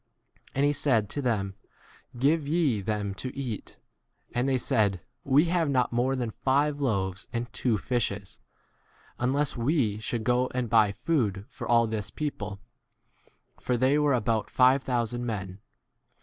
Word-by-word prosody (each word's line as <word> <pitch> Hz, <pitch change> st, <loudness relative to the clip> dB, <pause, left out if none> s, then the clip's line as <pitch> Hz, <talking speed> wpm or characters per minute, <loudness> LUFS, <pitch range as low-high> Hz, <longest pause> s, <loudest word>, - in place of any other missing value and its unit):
And 140 Hz, +1 st, +3 dB
he 145 Hz, -, +3 dB
said 115 Hz, -9 st, +1 dB
to 145 Hz, -, -2 dB
them, 105 Hz, -7 st, -1 dB, 0.6 s
Give 145 Hz, +4 st, +2 dB
ye 150 Hz, -9 st, +2 dB
them 105 Hz, -1 st, -2 dB
to 125 Hz, +7 st, -5 dB
eat. 125 Hz, -7 st, -5 dB, 0.6 s
And 125 Hz, +3 st, +1 dB
they 130 Hz, -, +2 dB
said, 100 Hz, -6 st, +1 dB, 0.2 s
We 140 Hz, +4 st, +4 dB
have 170 Hz, -2 st, +1 dB
not 125 Hz, -3 st, +1 dB
more 125 Hz, +3 st, +1 dB
than 120 Hz, -3 st, -2 dB
five 140 Hz, +5 st, +1 dB
loaves 95 Hz, -7 st, -1 dB
and 120 Hz, 0 st, -4 dB
two 120 Hz, -4 st, +1 dB
fishes, 100 Hz, -3 st, -2 dB, 0.8 s
unless 140 Hz, +4 st, +1 dB
we 120 Hz, -4 st, +1 dB
should 110 Hz, +1 st, -3 dB
go 125 Hz, +2 st, +2 dB
and 125 Hz, -3 st, -1 dB
buy 105 Hz, -2 st, +5 dB
food 110 Hz, -, -1 dB
for -, -, -7 dB
all 120 Hz, -1 st, +5 dB
14 110 Hz, -, -5 dB
this 105 Hz, -1 st, -4 dB
people; 105 Hz, -10 st, -4 dB, 1.0 s
for 125 Hz, -, 0 dB
they 130 Hz, +4 st, +3 dB
were 145 Hz, -2 st, +3 dB
about 110 Hz, -2 st, 0 dB
five 130 Hz, +1 st, +4 dB
thousand 120 Hz, -2 st, -1 dB
men. 95 Hz, -5 st, -4 dB
120 Hz, 155 wpm, -28 LUFS, 105-135 Hz, 1.0 s, buy